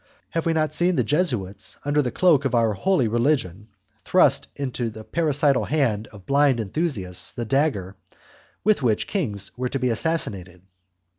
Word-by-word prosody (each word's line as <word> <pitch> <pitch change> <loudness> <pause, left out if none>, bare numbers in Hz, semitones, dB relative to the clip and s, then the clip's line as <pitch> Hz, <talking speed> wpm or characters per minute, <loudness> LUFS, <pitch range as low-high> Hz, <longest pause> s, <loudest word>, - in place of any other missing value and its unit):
Have 165 0 -1
we 165 - +2
not 155 -1 0
seen 175 +3 +2
the - - +2
Jesuits, 120 - -2
under 145 +1 +2
the 125 - -1
cloak 160 -2 +3
of 135 -3 0
our 115 -2 +2
holy 130 - +1
religion, 115 - 0 0.4
thrust - - +3
into 130 -4 -3
the 110 0 -10
parricidal 145 -2 +1
hand 120 -8 0
of 100 -3 -15
blind 140 -3 +3
enthusiasts 105 - -2
the 120 - -4
dagger 110 -7 0 0.7
with 215 -7 +3
which 115 -5 +1
kings 105 - -3
were 125 0 -2
to 135 - -2
be 125 -2 0
assassinated! 100 - -2
130 Hz, 160 wpm, -23 LUFS, 105-155 Hz, 0.7 s, cloak